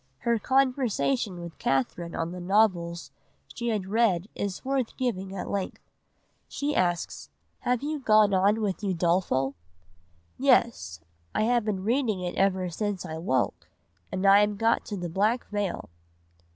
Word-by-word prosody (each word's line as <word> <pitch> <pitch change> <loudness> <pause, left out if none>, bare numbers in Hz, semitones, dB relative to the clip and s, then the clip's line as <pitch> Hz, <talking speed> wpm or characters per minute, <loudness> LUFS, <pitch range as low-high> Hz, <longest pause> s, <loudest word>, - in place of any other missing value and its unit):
Her 235 -1 +1
conversation 255 -5 +1
with 170 -1 -9
Catherine 150 +6 -1
on 165 +1 -2
the 180 - -6
novels 175 -3 +1 0.4
she 235 - -4
had 215 -5 0
read 200 -3 +2
is 200 +2 -4
worth 265 -3 -1
giving 195 -7 -2
at 185 - -4
length. 195 -2 -3 0.6
She 290 +1 -2
asks: 175 -2 -1 0.3
"'Have 250 +1 0
you 300 +1 -2
gone 215 -5 +4
on 200 +4 +3
with 200 -3 -2
Udolpho?' 170 -7 +1 0.9
"'Yes, 85 -1 +2 0.3
I - - +2
have 240 +1 +2
been 195 -3 -2
reading 230 -2 +1
it 180 -1 -3
ever 190 -1 +1
since 205 0 -3
I 160 -1 -5
woke; 130 -6 -1 0.4
and 190 +1 -2
I 195 +1 +8
am 210 0 +2
got 225 +2 +2
to 205 - -5
the 175 -1 -3
black 210 +8 +1
veil. 205 - -3
200 Hz, 150 wpm, -27 LUFS, 175-225 Hz, 0.9 s, I